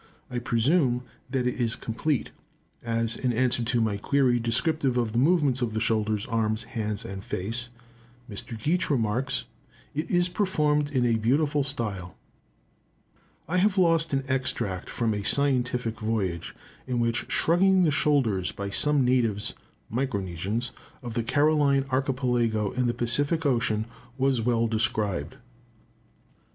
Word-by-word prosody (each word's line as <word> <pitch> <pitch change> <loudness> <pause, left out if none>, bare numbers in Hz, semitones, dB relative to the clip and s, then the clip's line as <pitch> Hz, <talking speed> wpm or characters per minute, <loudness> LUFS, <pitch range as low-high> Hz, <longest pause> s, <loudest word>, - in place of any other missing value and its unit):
I 125 - -2
presume 125 +2 +2 0.3
that 130 -1 -1
it 125 0 -1
is 115 0 +1
complete, 130 +5 -2 0.5
as, 115 0 0
in 125 - -1
answer 120 0 +1
to 120 +1 +1
my 110 -3 0
query 125 +2 +2
descriptive 130 +3 0
of 120 -3 0
the 115 - +2
movements 145 -3 +3
of 115 -3 -1
the - - +1
shoulders, 110 -2 0
arms, 110 0 -1
hands, 110 -1 -4
and 95 -3 -7
face, 115 +8 -3 0.6
Mr. 110 +1 -7
Geach 175 +9 0
remarks, 125 0 0 0.5
"it 155 +3 -3
is 175 0 +2
performed 150 -6 +1
in 130 -4 +1
a 115 -1 +2
beautiful 145 +5 +2
style." 105 - -3 1.3
I 175 +4 0
have 200 +2 +2
lost 165 -3 +3
an 135 -1 0
extract 130 -8 -2
from 115 -2 0
a 105 - -2
scientific 125 -2 +1
voyage, 105 -7 -2 0.3
in 125 -2 -1
which 115 -1 -1
shrugging 185 +3 +4
the 160 - +3
shoulders 130 -11 +1
by 100 0 -5
some 145 +3 +3
natives 115 -5 +1 0.4
(Micronesians) 105 -2 -2 0.3
of 120 -2 -5
the 115 - 0
Caroline 145 +2 +2
Archipelago 125 -5 0
in 125 -1 0
the 120 - -1
Pacific 145 +7 +1
Ocean, 115 -5 +1 0.3
was 135 -2 +2
well 115 0 +1
described. 110 -8 -1
120 Hz, 140 wpm, -26 LUFS, 110-140 Hz, 1.3 s, shrugging